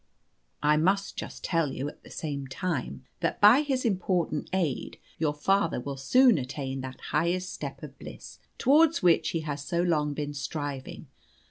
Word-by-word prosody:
I 150 +1 +4
must 195 +5 +1
just - - -7
tell 165 -5 +1
you, 135 - -3
at - - -10
the - - -14
same 140 -3 -4
time, 130 -3 -3
that 165 -1 -1
by 215 +7 +8
his 270 -4 -1
important 180 -7 0
aid 180 -7 -1 0.2
your 150 -2 +1
father 195 +2 +1
will 140 +2 -5
soon 240 - +4
attain 135 0 -4
that 130 0 -7
highest 175 +4 0
step - - -7
of - - -10
bliss - - -10 0.2
towards 310 - +4
which 165 -2 +4
he 165 - -1
has 145 -2 -4
so 170 +2 0
long 150 -4 +1
been 145 0 -3
striving. 145 -1 -5
160 Hz, 165 wpm, -28 LUFS, 145-185 Hz, 0.2 s, by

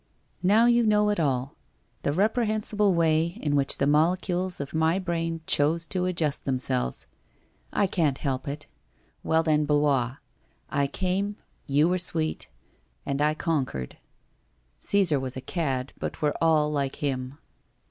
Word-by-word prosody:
Now 210 +6 +5
you 240 0 +4
know 210 -1 +3
it 205 - -1
all 135 -3 -1 0.2
— - - -42
the - - 0
reprehensible 210 - +1
way 165 +2 +2
in 145 -1 +1
which 140 -1 +2
the 140 - +1
molecules 175 +4 +1
of 140 0 -6
my 160 +2 +2
brain 165 -3 -2
chose 160 +3 +2
to 180 +2 -2
adjust 165 -5 -1
themselves. 130 - -1 0.7
I 205 - +2
can't 160 -7 0
help 135 -2 -3
it. 140 +2 -5 0.6
Well, 160 0 +2
then, 155 -2 +2
Blois! 145 -4 +2 0.6
I 140 -1 +1
came 190 +6 -1 0.2
— - - -39
you 145 +3 +3
were 180 +1 +1
sweet 160 -3 -2 0.3
— - - -41
and 140 +1 -2
I 150 +1 +2
conquered. 135 - -2 0.8
Caesar 185 -8 +2
was 130 0 -4
a - - -2
cad, 135 -5 -2
but - - -5
we're 150 -1 +1
all 155 -2 +3
like 140 -2 -1
him. 135 -1 -3
155 Hz, 155 wpm, -26 LUFS, 140-180 Hz, 0.8 s, Now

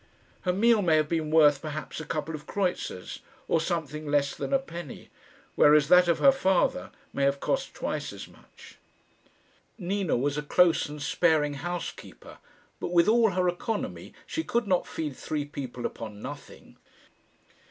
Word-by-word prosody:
Her 180 - 0
meal 220 +3 +3
may 165 -4 +3
have 155 -1 +2
been 160 -1 -1
worth 150 -3 +5
perhaps 155 0 -6
a 160 - -6
couple 155 +1 -3
of 150 -1 -8
kreutzers, 180 - -3 0.3
or 165 - +2
something 155 -3 -3
less 145 -1 +1
than - - -5
a 275 - +5
penny, 175 - -9 0.4
whereas 150 0 +5
that 180 0 +7
of 170 - +3
her 275 - +6
father 190 -9 +1 0.2
may 140 - -1
have 140 0 +2
cost - - -2
twice - - -3
as - - -9
much. - - -17 1.0
Nina 195 - -1
was 145 +3 0
a - - -2
close 165 +1 +3
and 150 0 -8
sparing 155 -1 +2
housekeeper, 175 +5 -7 0.4
but - - -3
with 170 -1 +4
all 225 0 +5
her 180 0 +1
economy 205 +5 -3
she 325 - -3
could 235 -5 0
not 185 -3 +1
feed 150 -4 -4
three 150 +1 -3
people 130 -4 -6
upon 105 -2 -6
nothing. - - -10
160 Hz, 165 wpm, -27 LUFS, 145-180 Hz, 1.0 s, that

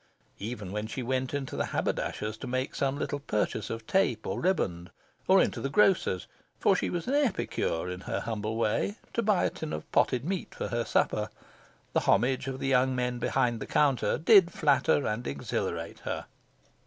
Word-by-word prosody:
Even 105 -3 -5
when 105 +1 -3
she 125 +3 -4
went 130 +1 -1
into 140 -2 -3
the - - -1
haberdasher's 105 0 -2
to - - -7
make 130 +2 -2
some 135 0 0
little 145 -1 -2
purchase 105 -5 -1
of 115 0 -5
tape 125 - +1
or 95 - -2
riband, 90 - 0 0.4
or - - +6
into - - +1
the 135 - -1
grocer's 175 - +3 0.3
for - - +4
she - - 0
was 175 -2 -3
an 265 - -1
epicure 210 - 0
in 90 0 -4
her - - -3
humble 110 -1 -3
way 115 - 0 0.2
to 235 - +1
buy 210 -4 +2
a - - +1
tin 160 - -6
of 75 - -4
potted 125 +1 +2
meat 185 +1 -3
for - - -3
her 120 -1 0
supper, - - +1 0.6
the - - +4
homage 130 +1 +2
of 135 0 -4
the 135 - -2
young 130 -1 +3
men 125 -1 -1
behind 120 -1 +1
the - - -6
counter 140 -4 +2
did 185 +1 +6
flatter 140 -2 +2
and 115 +3 -2
exhilarate 70 0 -3
her. - - -4
130 Hz, 190 wpm, -29 LUFS, 110-150 Hz, 0.6 s, or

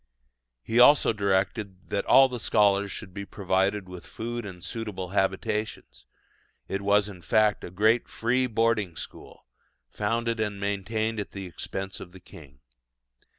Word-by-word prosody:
He 115 - +1
also 130 -1 +7
directed 100 -1 -1
that 100 - -2
all 135 0 +7
the 125 -2 -6
scholars 100 -2 +3
should 95 -2 -7
be 100 - -5
provided 95 0 0
with 90 -1 -10
food 120 -1 -5
and 90 -3 -10
suitable 105 -5 -5
habitations: 100 +3 -2 0.6
it 95 +1 -3
was 100 +1 +3
in 95 -4 -10
fact 105 +3 +2
a - - -6
great 110 +6 +2
free 125 +3 0
boarding 115 -6 +1
school, - - -10 0.5
founded 115 +2 -1
and 105 -2 -2
maintained 110 +3 -2
at 105 - -6
the 100 -1 -6
expense 95 +2 -6
of 90 - -10
the 95 - -12
king. 70 -6 -15
100 Hz, 150 wpm, -27 LUFS, 95-110 Hz, 0.6 s, also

